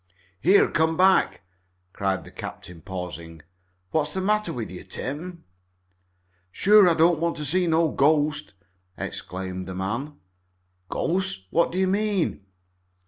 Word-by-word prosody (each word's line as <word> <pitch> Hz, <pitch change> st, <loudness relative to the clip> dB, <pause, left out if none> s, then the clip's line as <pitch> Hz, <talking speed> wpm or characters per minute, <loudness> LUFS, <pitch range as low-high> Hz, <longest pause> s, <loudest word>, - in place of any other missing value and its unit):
"Here! 190 Hz, -, +5 dB
Come 160 Hz, 0 st, +1 dB
back!" 190 Hz, +1 st, +3 dB, 0.5 s
cried 95 Hz, -1 st, -1 dB
the -, -, -13 dB
captain, 85 Hz, -2 st, -9 dB
pausing. 85 Hz, -4 st, -7 dB, 0.5 s
"What's 150 Hz, 0 st, 0 dB
the -, -, 0 dB
matter 210 Hz, +2 st, +1 dB
with 115 Hz, -6 st, -5 dB
you, 90 Hz, -, -8 dB
Tim?" 170 Hz, +6 st, -6 dB, 1.1 s
"Sure 200 Hz, -, +6 dB
I 165 Hz, -, +2 dB
don't 165 Hz, 0 st, +4 dB
want 170 Hz, +1 st, -1 dB
to 150 Hz, +2 st, 0 dB
meet 185 Hz, -1 st, +2 dB
no 165 Hz, 0 st, +3 dB
ghost!" 150 Hz, -3 st, +1 dB, 0.4 s
exclaimed 95 Hz, 0 st, -5 dB
the 95 Hz, -, -6 dB
man. 115 Hz, +11 st, -3 dB, 0.7 s
"Ghost? 185 Hz, -, -1 dB
What 170 Hz, -, +2 dB
do 180 Hz, -, -4 dB
you 190 Hz, -, +3 dB
mean?" 200 Hz, -, 0 dB
155 Hz, 135 wpm, -25 LUFS, -, 1.1 s, Sure